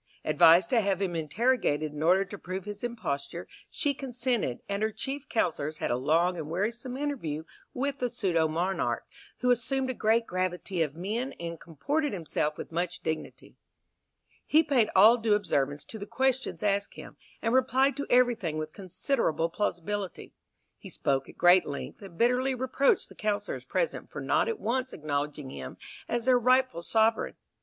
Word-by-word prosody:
Advised 170 +2 +6
to 240 -3 +4
have 195 -2 0
him 185 -3 -1
interrogated 160 - 0
in 150 - -6
order 185 +4 +4
to 200 +1 -9
prove 185 +1 -5
his 205 +1 -7
imposture, 175 -9 -4 0.2
she 290 -2 0
consented, 245 - -2
and 200 +1 -2
her 220 0 +1
chief 275 +6 -5
counsellors 155 - -1
had - - -2
a - - +2
long 165 +8 +2
and 155 -3 -5
wearisome 235 +8 -2
interview 240 - -3 0.3
with 275 +1 -2
the 250 - 0
pseudo 185 -9 +1
monarch, 175 +5 -1 0.4
who 250 - +3
assumed 260 +2 +1
a - - -4
great 225 0 +2
gravity 185 -1 -2
of 150 -2 -1
mien 220 +10 -3
and 170 -1 -6
comported 280 - -2
himself 155 -4 -2
with - - -7
much 175 +1 -2
dignity; 160 -1 -5 0.9
he 315 +2 +5
paid 260 -8 +2
all 215 +5 +8
due 220 -3 +2
observance 145 -8 -1
to 220 - -8
the 205 - -7
questions 260 +2 0
asked 200 -1 0
him, - - -10 0.2
and 230 0 0
replied 260 +1 +3
to 285 - -4
everything 235 -10 +3
with 155 0 -4
considerable 185 - -1
plausibility. 195 +1 -3 0.5
He - - -10
spoke 135 -1 -1
at - - -14
great 180 +1 +6
length, 140 +7 -6
and 190 -4 -11
bitterly 250 +3 +2
reproached 260 +2 +1
the - - -14
counsellors 210 -1 -2
present - - -2
for - - -7
not - - +1
at 450 - -3
once 255 +3 -1
acknowledging 145 -2 -3
him 65 -1 -8 0.3
as 240 -1 -1
their 255 -1 +5
rightful 255 -5 +3
sovereign. 225 +5 +2
205 Hz, 170 wpm, -29 LUFS, 165-250 Hz, 0.9 s, all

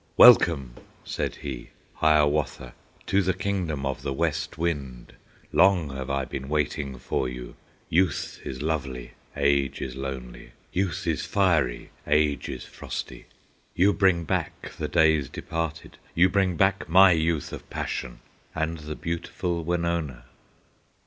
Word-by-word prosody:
"Welcome!" 70 -8 +7 0.3
said - - -3
he, 65 -4 -5 0.3
"Hiawatha, 75 -4 +2 0.3
To 100 - +3
the 95 0 0
kingdom 85 -8 -2
of 70 -1 -2
the 70 - -3
West 80 +1 -1
Wind 70 -7 -3 0.4
Long 85 -6 +4
have 65 0 -5
I 70 -1 0
been 65 +2 -6
waiting 70 -2 -1
for 65 0 -2
you 60 -1 -8 0.3
Youth 90 -2 +1
is 65 +1 -5
lovely, 65 -6 -3 0.3
age 70 -1 +2
is 65 -1 -5
lonely, 65 -2 -7 0.2
Youth 90 -4 -1
is - - 0
fiery, 85 -11 +1 0.2
age 75 -1 +2
is 65 - -6
frosty; - - -7 0.5
You 100 +3 +4
bring 95 -4 +3
back 80 - -3
the - - -3
days 80 -5 +3
departed, 80 +1 -5 0.2
You 90 +3 +5
bring 95 -2 +2
back 95 -1 +1
my 95 +2 +8
youth 80 -2 0
of - - -9
passion, 65 -2 -4 0.3
And 80 +1 -1
the 75 0 -6
beautiful 85 +1 -3
Wenonah!" 85 -6 -1
75 Hz, 135 wpm, -26 LUFS, 70-85 Hz, 0.5 s, my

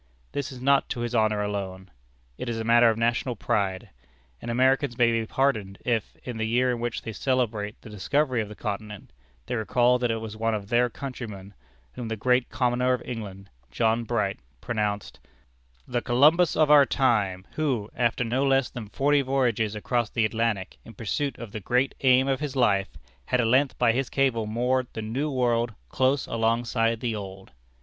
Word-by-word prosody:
This 140 - -3
is 130 - -9
not 140 +2 +2
to 120 - -3
his 120 0 -3
honor 110 -2 +2
alone: 95 -2 -5 0.4
it 120 - -5
is 115 -1 -3
a - - -2
matter 120 +1 +5
of 110 - 0
national 120 +2 0
pride; 95 -3 -1 0.5
and 120 - -6
Americans 130 +1 +2
may 120 -1 +4
be 115 -1 -1
pardoned 110 -9 0
if, 115 -3 -1
in 125 -3 -6
the 110 0 -1
year 125 +3 +2
in 120 - -3
which 120 -1 -3
they 110 - -5
celebrate 110 -3 -1
the - - -10
discovery 130 +4 0
of 105 - -5
the 105 - -9
continent, 105 -1 -6 0.3
they - - -4
recall 120 +2 +2
that 120 -1 0
it 115 - 0
was 110 -1 -7
one 115 0 0
of 100 -1 -6
their 120 +1 +3
countrymen 110 -7 -7 0.4
whom 120 - -6
the 110 - -2
Great 125 +3 +1
Commoner 125 0 +1
of 125 - -3
England, 100 -5 -7 0.2
John 115 0 +1
Bright, 105 -4 -1 0.2
pronounced 105 -3 -3 0.7
"the 120 -1 -1
Columbus 150 +9 +4
of 155 -1 +3
our 145 -2 +7
time, 105 -6 +1
who, 130 -9 -1
after 120 0 +1
no 125 +4 0
less 135 -2 +2
than 110 -4 -7
forty 145 +4 +2
voyages 120 -6 0
across 120 +2 -1
the 115 -2 +1
Atlantic 110 -3 -2
in 115 - -13
pursuit 135 +7 -2
of 115 -4 -8
the 110 - -5
great 125 +7 +1
aim 130 0 +4
of 135 -1 0
his 145 -2 -4
life, 100 -7 +2 0.4
had 125 - +1
at 120 - +2
length 130 +4 +2
by 120 -2 +4
his 130 +2 -1
cable 125 -5 +1
moored 125 +3 0
the 110 - -5
New 130 +8 -2
World 120 -4 0
close 130 +1 +1
alongside 115 0 0
the 115 -3 -1
Old." 95 -2 -8
120 Hz, 190 wpm, -26 LUFS, 110-130 Hz, 0.7 s, our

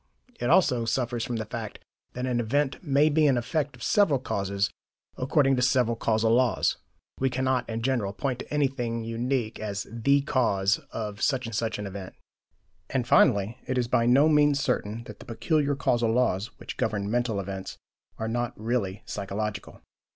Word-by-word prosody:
It - - -1
also 125 -10 +4
suffers 120 -1 -1
from 125 -2 -3
the 110 -1 -3
fact 110 -1 -6 0.4
that 125 +1 -3
an 125 -2 0
event 135 +7 0
may 145 -1 +3
be 155 0 +3
an 135 -3 +3
effect 145 +4 -1
of - - -11
several 200 -10 +3
causes 100 -5 -1 0.4
according 135 +1 +2
to - - +1
several 125 -2 +2
causal 110 0 +1
laws 125 -1 +2 0.4
we 135 - +2
cannot, 130 0 0
in 115 0 -3
general, 120 -6 0
point 125 +3 -3
to - - -9
anything 130 -6 -1
unique 115 0 -2
as 105 -2 -4
THE 140 +5 +2
cause 105 -8 +1
of 105 -2 -5
such 130 -2 +1
and 115 - -6
such 110 +1 -1
an 105 - -5
event. 100 -1 -7 0.7
And 125 -3 -1
finally 105 +1 +4
it 130 - -1
is 120 -1 +1
by 120 -1 +2
no 135 +5 +5
means 150 -2 +4
certain 110 -4 -1
that - - -11
the - - -12
peculiar 145 +4 0
causal 120 -4 +1
laws 115 -4 +1
which - - -8
govern 100 -1 -1
mental 120 -3 0
events 95 0 -6 0.4
are 110 - -3
not 120 0 -2
really 110 -3 -2
physiological. 105 +1 -5
120 Hz, 175 wpm, -27 LUFS, 110-130 Hz, 0.7 s, no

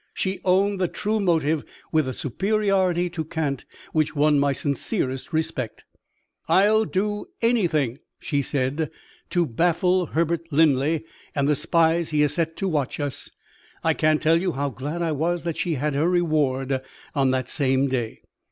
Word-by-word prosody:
She 190 0 -1
owned 195 +1 +2
the 180 - +3
true 215 +5 -1
motive 160 -5 +1 0.3
with 155 -4 +2
a 130 - -2
superiority 190 - +1
to 165 -2 -3
cant 155 -5 -3 0.3
which 155 -1 +1
won 150 0 +4
my 140 0 +3
sincerest 135 -1 -2
respect. 160 -7 -2 0.6
'I'll 215 +3 +4
do 210 - -2 0.2
anything,' 160 - +2 0.2
she 145 -2 -1
said, 140 +3 -1 0.4
'to 175 -2 +2
baffle 175 - +2
Herbert 165 +1 -1
Linley 150 +1 +2 0.3
and 140 -1 +1
the 150 - +4
spies 165 +3 +2
he 150 -1 +2
has 150 -1 +2
set 165 -2 -1
to 195 - -1
watch 150 -7 -1
us.' 145 -2 -4 0.5
I - - +3
can't 155 0 +2
tell 165 +1 +4
you 180 -2 0
how 140 0 -2
glad 150 +7 -4
I 165 - 0
was 165 +4 -1
that 170 -2 -3
she 170 -3 0
had 145 +2 -1
her 150 +5 +2
reward 140 -7 +1 0.3
on 135 -2 +2
the 130 0 0
same 135 0 +1
day. 125 -4 -3
160 Hz, 160 wpm, -24 LUFS, 140-175 Hz, 0.6 s, won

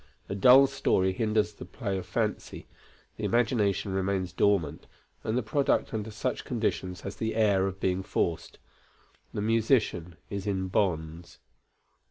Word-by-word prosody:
A - - -2
dull 125 +7 +7
story 95 -8 +1
hinders 105 0 0
the - - -10
play 100 -6 -4
of 95 - -5
fancy; - - -3 0.5
the - - -7
imagination 110 -4 +1
remains 95 -2 -1
dormant, 90 -7 +1 0.4
and 110 +2 -1
the 125 - 0
product 135 +4 +1
under 110 0 -3
such 105 -1 -3
conditions 90 -1 -2
has 100 - -7
the 110 -1 -2
air 100 -4 +3
of 95 0 -6
being 95 0 0
forced. 85 -3 -2 0.7
The 105 - -3
musician 110 -6 +1
is 100 0 -5
in 95 -2 -1
bonds. 85 -2 -2
100 Hz, 145 wpm, -28 LUFS, 95-110 Hz, 0.7 s, dull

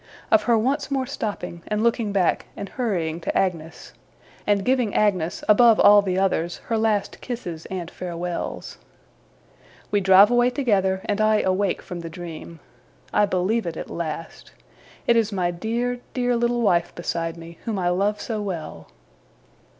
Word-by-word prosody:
Of 220 - +6
her 235 -2 +4
once 270 +6 0
more 270 -2 0
stopping, 210 -9 -5
and 210 +1 -1
looking 235 -2 +1
back, 190 -3 +1
and 200 - -6
hurrying 175 -10 -2
to - - -2
Agnes, 170 -4 -2 0.5
and 205 -2 +2
giving 250 -5 +1
Agnes, 185 -6 +1
above 225 +1 +6
all 205 0 +8
the 185 -2 -2
others, 175 -3 0
her 225 - +1
last 215 -2 0
kisses 175 -10 -6
and 180 -3 -5
farewells. 175 -1 -5 1.1
We 205 -1 +2
drive 195 +3 +7
away 240 0 +4
together, 200 -8 +1
and 210 0 0
I 215 0 +3
awake 190 +1 0
from 180 - -7
the 165 -1 -6
dream. 165 -2 -9 0.5
I 210 - +4
believe 195 +3 0
it 165 -1 -4
at - - -7
last. 165 -1 -6 0.5
It 235 - +4
is 225 -2 +2
my 180 -3 0
dear, 235 +7 -2 0.2
dear, 245 -1 +1
little 240 0 +1
wife 175 -4 +2
beside 165 -1 -3
me, 165 0 -11
whom 225 -3 -2
I 175 -2 +1
love 200 +4 0
so 220 -3 -3
well! 165 - -6
200 Hz, 160 wpm, -23 LUFS, 175-225 Hz, 1.1 s, all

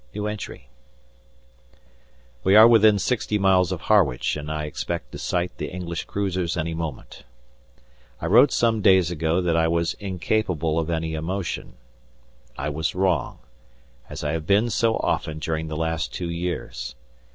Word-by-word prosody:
We 95 +2 +4
are 110 +2 +10
within 110 -3 +6
sixty 110 0 0
miles 95 -2 +3
of 90 -3 -4
Harwich 90 - +2
and 75 0 -5
I 75 -1 -3
expect 65 -4 -5
to - - -8
sight 90 0 -2
the - - -3
English 90 -2 -5
cruisers 95 -4 -2
any 80 +1 -2
moment. 80 -5 -6 1.0
I - - -5
wrote 140 - +6
some 115 -2 +2
days 95 -4 +4
ago 80 +2 0
that 85 -2 +1
I 80 0 +3
was 85 0 0
incapable 90 -4 -1
of 80 0 -2
any 80 -1 -2
emotion. 85 +4 -4 0.8
I 70 - -3
was 80 +3 -2
wrong, 90 -5 0 0.7
as - - -7
I 75 - -1
have 80 -1 -4
been 105 +4 +3
so 115 +2 +2
often 75 0 -1
during 80 0 -3
the 80 0 -5
last 80 0 -2
two 85 -2 -4
years. 65 -7 -4
85 Hz, 150 wpm, -24 LUFS, 80-95 Hz, 1.0 s, are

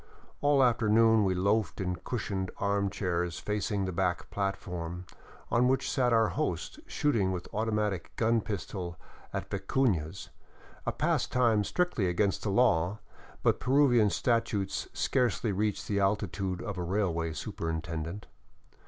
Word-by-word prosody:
All 145 0 +4
the - - +7
afternoon 115 -2 +4
we 95 -1 +1
loafed 100 +1 +1
in 90 -2 -1
cushioned 95 -2 -3
armchairs 95 -4 -1
facing 105 -1 -1
the 95 - -2
back 90 0 -1
platform, 90 -3 -3 0.5
on 120 +2 +4
which 130 +1 +1
sat 125 -2 +2
our 115 -2 +4
host - - -3
shooting 110 -11 +1
with 90 -2 -4
auto 110 +2 -1
matic 105 -5 -1
gun 115 0 +2
pistol 90 -3 -5 0.3
at - - -4
vicunas, 95 - 0 0.6
a - - +2
pastime 115 -4 +2
strictly 175 - 0
against 95 +2 +1
the 105 - -2
law, 100 -4 +3 0.5
but - - +3
Peruvian 125 -5 +4
statutes 100 -1 0
scarcely 125 -4 +1
reach 105 +1 -1
the 100 -1 0
altitude 95 -1 -1
of 100 -5 -4
a - - -1
railway 85 -3 0
superintend 80 +1 -4
ent. 100 +5 -7
100 Hz, 135 wpm, -30 LUFS, 90-115 Hz, 0.6 s, the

